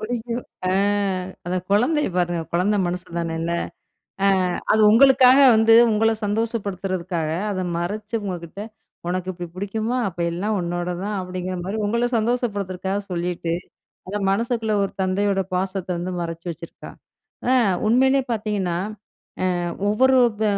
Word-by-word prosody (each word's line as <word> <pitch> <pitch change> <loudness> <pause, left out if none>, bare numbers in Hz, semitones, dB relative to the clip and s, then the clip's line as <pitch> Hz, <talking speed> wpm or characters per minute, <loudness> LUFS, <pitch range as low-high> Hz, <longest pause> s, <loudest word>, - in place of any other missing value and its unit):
புடிக்கும். 235 +2 -3 0.3
அ - - +2 0.8
அந்த 180 +1 -1
குழந்தைய 275 +9 +2
பாருங்க! 175 -1 0
குழந்தை 185 +5 +2
மனசு 180 +1 -4
தான 165 -1 -2
இல்ல? 170 +1 -2 0.7
அ - - +5 0.4
அது 215 0 +4
உங்களுக்காக 260 +2 +7 0.2
வந்து 225 +1 +5 0.2
உங்கள 220 +1 +3
சந்தோஷப்படுத்துறதுக்காக 195 -6 -2 0.2
அத 185 -1 -2
மறைச்சு 210 +6 -3
உங்ககிட்ட, 180 -1 -6 0.5
"உனக்கு 185 +1 -2
இப்படி 175 0 -7
புடிக்குமா? 220 +5 -2
அப்ப 175 - -14
எல்லாம் 205 +5 -1
உன்னோடது 175 +1 -3
தான்." 210 -1 -2
அப்படிங்கிற 185 0 -4
மாரி 195 +4 -3
உங்கள 235 +3 +1
சந்தோஷப்படுத்துறதுக்காக 200 -5 -1
சொல்லீட்டு, 175 -1 -2 0.6
அத 200 - -3
மனசுக்குள்ள 225 +1 0
ஒரு - - -4
தந்தையோட 195 +1 +1
பாசத்த 190 0 -2
வந்து 180 +1 -3
மறைச்சு 165 0 -5
வச்சுருக்கா. 170 0 -9 0.6
அ - - +5 0.3
உண்மையிலே 265 +4 +4
பார்த்தீங்கன்னா, 205 -5 -1 0.8
அ - - -1 0.3
ஒவ்வொரு 260 +4 +4 0.2
ப - - +2
195 Hz, 130 wpm, -22 LUFS, 180-225 Hz, 0.8 s, உங்களுக்காக